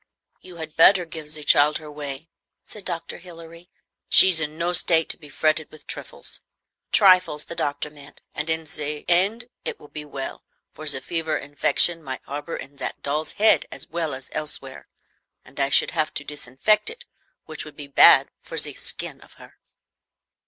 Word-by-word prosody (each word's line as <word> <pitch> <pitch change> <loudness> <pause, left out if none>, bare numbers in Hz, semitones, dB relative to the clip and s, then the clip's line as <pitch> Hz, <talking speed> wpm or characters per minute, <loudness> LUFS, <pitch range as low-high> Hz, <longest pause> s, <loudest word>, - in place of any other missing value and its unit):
"You 180 -1 -13
had 160 -2 -7
better 180 +2 +7
give 160 -2 -8
ze 150 0 -5
child 145 +1 +4
her 155 -1 -10
way," 145 +1 -6 0.4
said 210 -3 -11
Dr. 170 - -4
Hilary. 170 0 -13 0.4
"She's 185 -3 +7
in 155 0 -3
no 170 +1 0
state 165 -2 +4
to - - 0
be 150 -3 -13
fretted 155 +1 0
with 155 - -14
triffles - - -7 0.5
[trifles, 185 - +5
the - - -7
doctor 145 -1 -3
meant], 145 -1 -15
and 150 +1 -3
in 160 0 0
ze 150 -1 -5
end 195 +7 +2 0.2
it - - -4
will 150 - -15
be 150 - -7
well; 140 -2 -7 0.3
for 155 - -8
ze 135 -2 +2
fever 160 +3 -1
infection 145 +4 +1
might 130 -4 -7
harbor 145 +4 -5
in 140 +1 -11
zat - - -5
doll's 150 +2 -2
head 215 +1 +3
as - - -9
well 160 -4 -2
as 130 0 -11
elsewhere, 135 -3 -5 0.6
and 135 +2 -12
I 140 0 +2
should - - +3
have 155 -2 -1
to - - -3
disinfect 145 - 0
it, 480 +1 -9 0.4
which 155 -1 -6
would 155 - -12
be 145 - -8
bad 140 - +6
for - - -9
ze - - 0
skin - - -4
of - - -18
her." - - -17
155 Hz, 180 wpm, -24 LUFS, 145-170 Hz, 0.6 s, better